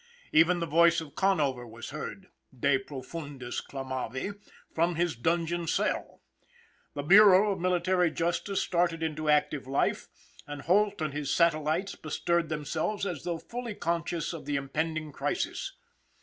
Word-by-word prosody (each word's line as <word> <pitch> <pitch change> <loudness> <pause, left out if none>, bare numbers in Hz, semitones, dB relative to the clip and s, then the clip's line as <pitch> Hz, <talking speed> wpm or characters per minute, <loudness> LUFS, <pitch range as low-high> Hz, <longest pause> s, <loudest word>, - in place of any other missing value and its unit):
Even 165 +3 +5
the 170 - -1
voice 170 +1 +4
of 155 -4 -9
Conover 145 -10 +1
was 115 +3 -9
heard, 185 +5 -7 0.3
de 140 +1 +3
profundis 140 -1 -6
clamavi, 130 - -4 0.4
from 170 +1 +1
his 170 -3 0
dungeon 170 +5 0
cell. - - -1 0.7
The 145 - -3
Bureau 200 +4 +7
of 190 - -3
Military 180 0 +2
Justice 175 +4 -1
started 170 -2 0
into 155 -1 -2
active 150 -2 +2
life, 135 +1 0 0.4
and 145 -1 -7
Holt 200 +1 +2
and 150 -2 -2
his 145 -2 -2
satellites 165 +2 +2
bestirred 170 +1 -1
themselves 155 +7 -2
as 175 -8 -4
though 170 -1 -1
fully 235 +4 -6
conscious 170 -1 -2
of 165 - -8
the 145 - -1
impending 155 +3 -2
crisis. - - -2
165 Hz, 140 wpm, -29 LUFS, 145-175 Hz, 0.7 s, Bureau